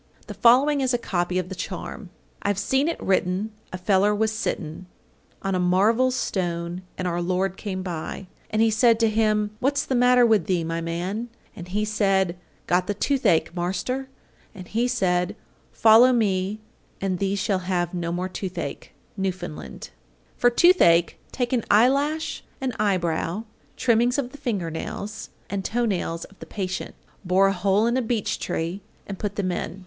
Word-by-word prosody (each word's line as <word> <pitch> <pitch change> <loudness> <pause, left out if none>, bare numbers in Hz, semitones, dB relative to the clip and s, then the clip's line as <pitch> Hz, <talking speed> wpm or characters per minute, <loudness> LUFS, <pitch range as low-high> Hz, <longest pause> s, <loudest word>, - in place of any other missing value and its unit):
The - - -7
following 275 +5 +4
is 255 -2 +1
a - - +2
copy 180 -5 -1
of 180 -1 -2
the - - -5
charm: 185 +1 -6 0.3
I've 200 -1 0
seen 265 +8 +1
it 335 - -2
written 190 +2 0 0.2
a 185 - -4
feller 195 +2 +2
was 220 +1 +1
sitten 180 -4 -4 0.6
On 195 0 -1
a 185 - +1
marvel 205 +8 +3
stone, 175 -7 -2 0.2
and 185 - -2
our 175 0 -1
Lord 185 +1 0
came 190 -2 -4
by, 175 +1 -5 0.2
And 220 +1 +2
He 225 - +3
said 225 +1 +4
to 225 - +5
him, 215 -1 +1
"What's 280 +2 +1
the - - -2
matter 250 0 +5
with 215 -7 +3
thee, 180 -3 +1
my 165 +1 -3
man?" 180 +8 -3 0.3
And 175 - -8
he 205 +4 -1
said, 195 -4 +1 0.3
"Got 180 +1 +1
the 205 - -1
toothache, 210 - +1
Marster," 190 +10 -2 0.5
And 185 -2 -9
he 235 +3 0
said, 190 -5 0 0.4
"Follow 225 +3 +6
me 205 -3 0 0.4
and 190 -2 -1
thee 195 0 0
shall 200 -1 0
have 175 -2 0
no 170 -1 -2
more 180 +2 -2
toothache." 185 0 -5 0.2
Newfoundland. 130 - -5 0.5
833. - - -27
For 245 - +6
toothache 240 - +5
take 245 0 -2
an 240 -3 +1
eyelash, 280 +8 +2 0.2
an 260 -2 -2
eyebrow, 185 -1 0 0.3
trimmings 240 +1 +2
of 255 -3 -2
the 290 - -12
finger 205 - -2
nails, 200 +6 -6 0.2
and 200 -1 -3
toe 240 +5 0
nails 170 -5 -2
of 195 - -20
the - - -10
patient, 190 -2 -4 0.3
bore 185 +1 +3
a - - 0
hole 195 +3 +2
in 235 +1 +1
a 260 - +2
beech 225 -3 -1
tree, 170 +5 -3 0.2
and 195 -2 -7
put 205 -1 -3
them 190 -3 -1
in. 175 +1 -4
195 Hz, 175 wpm, -24 LUFS, 180-230 Hz, 0.6 s, Follow